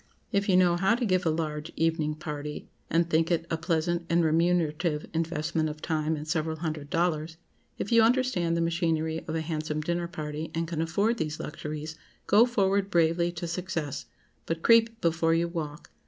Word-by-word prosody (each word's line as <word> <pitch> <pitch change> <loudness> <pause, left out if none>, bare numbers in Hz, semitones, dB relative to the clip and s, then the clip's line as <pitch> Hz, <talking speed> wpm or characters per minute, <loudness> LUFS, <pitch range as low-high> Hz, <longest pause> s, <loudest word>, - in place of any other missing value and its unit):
If 200 0 +1
you 185 - +5
know 175 -2 +4
how 195 +5 +3
to 245 0 -1
give 185 -4 +1
a - - +4
large 155 -1 -2
evening 160 -2 0
party 150 -1 -6 0.2
(and 165 +1 +2
think 165 0 +2
it 170 -1 +1
a 165 - +1
pleasant 170 +1 0
and 170 +1 +3
remunerative 165 -1 +1
investment 160 -1 -1
of 150 0 -7
time 155 0 -1
and 150 0 -7
several 160 0 -1
hundred 155 -3 -4
dollars)—if 165 +4 -3
you 230 -1 +6
understand 225 -8 +2
the - - +1
machinery 165 -1 0
of 160 - -3
a 160 - 0
handsome 155 -1 -3
dinner 170 +2 -1
party, 155 -2 -5
and 165 0 -1
can 165 -1 -2
afford 200 +8 +1
these 155 0 -2
luxuries, 155 +1 -6 0.3
go 220 +5 +6
forward 200 -4 +1
bravely 170 -1 +2
to 175 0 -5
success. 170 -4 -4 0.4
But 165 0 -3
creep 230 0 +5
before 165 0 +2
you 170 +1 +1
walk. 160 -2 -6
165 Hz, 180 wpm, -28 LUFS, 155-175 Hz, 0.4 s, you